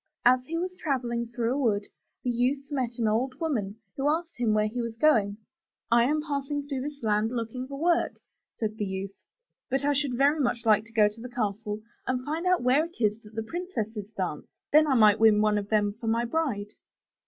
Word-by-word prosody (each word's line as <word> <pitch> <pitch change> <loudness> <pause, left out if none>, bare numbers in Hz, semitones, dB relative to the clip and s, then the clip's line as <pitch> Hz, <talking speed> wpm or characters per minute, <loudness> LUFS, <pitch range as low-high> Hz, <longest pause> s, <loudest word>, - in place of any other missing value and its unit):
As 250 +1 +5
he 330 - -2
was 365 +2 -2
travelling 245 -9 -2
through 235 0 -1
a - - -1
wood, 210 -6 +1 0.4
the 245 - +1
youth 270 +4 0
met 250 -4 -2
an 230 -2 +1
old 250 +5 0
woman 225 -12 -1 0.2
who 275 +2 +1
asked 335 +2 -1
him 240 -3 +1
where 215 0 +3
he 235 +3 -2
was 230 -1 -4
going. 225 -7 +3 0.5
I 235 0 +6
am 300 +3 +1
passing 285 -1 -3
through 275 -3 -3
this 285 -1 -6
land 215 0 +2
looking 245 +2 -4
for 275 0 -7
work,'* 340 +1 +1 0.4
said 215 -1 -3
the 210 - 0
youth, 190 0 -4 0.6
*'but 270 +2 0
I 290 - +3
should 275 -3 0
very 285 +4 +4
much 240 -4 0
like 215 -1 +4
to 230 - -14
go 215 -2 +5
to 210 +2 -7
the 250 - -7
castle 215 -3 -3 0.3
and 255 0 -1
find 320 +4 -2
out 365 -7 +3
where 265 +5 +4
it 335 -4 -13
is 215 -1 +1
that 215 0 -15
the 225 - -2
princesses 220 - -4
dance; 180 -6 -3 0.2
then 305 +1 +6
I 270 - +3
might 215 -3 +6
win 220 -2 +6
one 210 0 +3
of 200 0 -7
them 210 -2 +2
for 225 +2 -8
my 230 +1 +2
bride." 235 -8 -1
240 Hz, 220 wpm, -27 LUFS, 215-280 Hz, 0.6 s, I